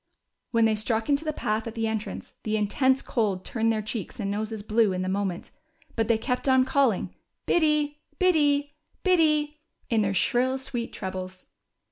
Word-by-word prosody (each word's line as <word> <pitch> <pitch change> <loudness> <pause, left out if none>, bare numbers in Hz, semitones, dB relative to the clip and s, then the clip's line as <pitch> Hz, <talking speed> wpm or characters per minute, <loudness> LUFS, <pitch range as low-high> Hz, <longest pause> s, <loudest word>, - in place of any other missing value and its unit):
When 230 -1 +3
they 220 - +3
struck 220 +2 0
into 285 +1 +2
the 310 - -1
path 220 -5 -2
at 225 - -7
the 225 -1 -1
entrance 220 -1 -4
the 215 0 -1
intense 260 +6 +2
cold 200 -6 -1
turned 225 -1 +1
their 215 -1 -1
cheeks 220 +3 -5
and 200 -2 -2
noses 215 +1 -3
blue 215 -1 +2
in 185 0 -2
a - - -3
moment, 190 -2 -2 0.4
but 225 -2 +1
they 230 -1 +3
kept 250 +3 -1
on, 260 -1 +5
calling 265 -6 +1 0.3
Biddy, 300 -3 +2 0.2
Biddy, 290 -6 +2 0.3
Biddy," 305 -5 +2 0.3
in 225 -2 +3
their 195 -1 0
shrill 255 +7 +2
sweet 245 -3 -4
trebles. 185 0 -6
230 Hz, 170 wpm, -26 LUFS, 210-280 Hz, 0.4 s, on